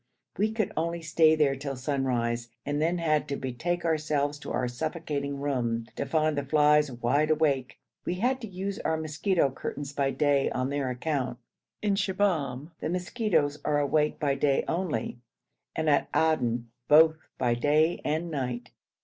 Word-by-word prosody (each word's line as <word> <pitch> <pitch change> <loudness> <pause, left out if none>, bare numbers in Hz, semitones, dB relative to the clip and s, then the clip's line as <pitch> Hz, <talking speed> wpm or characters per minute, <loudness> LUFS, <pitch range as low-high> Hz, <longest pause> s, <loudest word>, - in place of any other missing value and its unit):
We 215 +2 +1
could 220 -2 -1
only 170 +1 -2
stay 160 -1 +4
there 145 -3 +2
till 135 0 -4
sunrise, 125 -3 -1 0.2
and 145 +1 -1
then 170 +3 +1
had 155 -3 +1
to 140 - -2
betake 165 +8 -3
ourselves 150 -2 0
to - - -7
our 125 - 0
suffocating 140 +1 -3
room, 120 -5 -1
to - - -3
find 155 -1 +1
the 145 - -1
flies 150 0 +4
wide 125 +6 +1
awake. 145 -5 +1 0.3
We 175 - -2
had 250 +7 0
to 225 - -5
use 195 +1 -4
our 160 - 0
mosquito 155 0 +1
curtains 140 +2 -6
by 140 -1 +1
day 140 -1 +2
on 130 +2 -2
their 140 -2 -1
account. 125 -1 -2 0.5
In 205 -1 +2
Shibahm 175 - 0
the - - -3
mosquitoes 175 -5 0
are 150 -1 +1
awake 150 +1 +1
by 145 -2 +1
day 140 0 +2
only, 170 -7 -2 0.6
and 160 0 -1
at 145 -2 +3
Aden 120 -7 +1 0.2
both 155 +1 +6 0.2
by 120 -1 +2
day 150 +7 +2
and 160 +3 -1
night. 125 -4 -3
150 Hz, 165 wpm, -28 LUFS, 135-160 Hz, 0.6 s, both